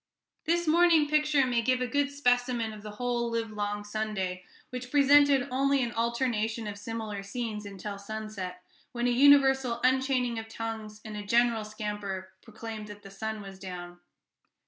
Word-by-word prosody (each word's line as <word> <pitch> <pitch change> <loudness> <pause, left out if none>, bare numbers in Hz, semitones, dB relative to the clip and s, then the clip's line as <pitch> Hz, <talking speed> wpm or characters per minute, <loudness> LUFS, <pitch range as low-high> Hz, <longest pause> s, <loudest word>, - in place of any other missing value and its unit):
This 345 +1 +1
morning 330 -1 +5
picture 300 -2 +3
may 245 -2 +1
give 255 +2 +2
a 255 - 0
good 285 +2 +1
specimen 245 -4 +1
of 210 - -10
the 210 - -8
whole 240 0 -1
livelong 210 -2 -2
Sunday, 205 -4 -3 0.3
which 250 0 -6
presented 285 -1 +5
only 275 +1 +2
an 235 - -2
alternation 230 -1 -1
of 205 -1 -6
similar 215 -2 -5
scenes 210 0 -4
until 200 +1 -6
sunset, 200 -4 -6 0.3
when 240 0 -1
a 245 - +3
universal 265 -2 +5
unchaining 255 -2 +2
of 225 - -8
tongues 225 -1 -6
and 215 -1 -6
a 210 - -4
general 230 +1 +2
scamper 210 -3 -5
proclaimed 220 -1 -8
that 205 0 -11
the 195 - -11
"sun 220 +1 -4
was 195 -1 -10
down." 175 -2 -8
225 Hz, 160 wpm, -29 LUFS, 210-255 Hz, 0.3 s, morning